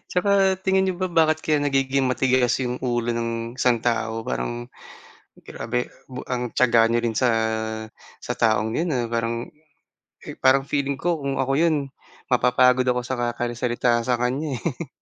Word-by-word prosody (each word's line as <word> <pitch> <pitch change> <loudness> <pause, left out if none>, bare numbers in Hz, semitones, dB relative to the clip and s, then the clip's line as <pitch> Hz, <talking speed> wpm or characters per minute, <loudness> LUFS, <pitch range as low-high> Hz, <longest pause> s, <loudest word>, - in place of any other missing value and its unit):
'Tsaka 185 +3 0 0.3
tingin 190 0 +2
n'yo 185 - 0
ba 185 - +1
bakit 160 -2 +3
kaya 155 -1 +2
nagiging 135 -1 +1
matigas 130 -1 +2
'yong 125 0 -3
ulo 120 -1 0
ng 115 0 -2 0.3
isang 120 -3 +2
tao? 115 -1 -1
Parang - - -4 0.8
grabe, 120 +2 -3 0.2
ba 130 -1 -6
ang 125 -1 -3
tiyaga 120 -2 +4
n'yo 115 +1 +1
rin 115 -2 -2
sa, 125 - +3 0.9
sa - - -3
taong 110 -1 +2
'yon, 165 -1 0
ah, 125 -2 0
parang, 115 0 -2 0.9
parang 135 +1 +4
feeling 140 -1 -1
ko 170 +1 -1
kung 140 -1 -2
ako 135 +1 0
yun 165 -2 +3 0.5
mapapagod 125 0 +3
ako 125 0 +1
sa 130 - -2
kakari 120 0 -2
salita 120 0 +1
sa 125 0 0
kanya, 130 +3 -1
eh. 165 -1 -4
125 Hz, 160 wpm, -23 LUFS, 120-135 Hz, 0.9 s, tiyaga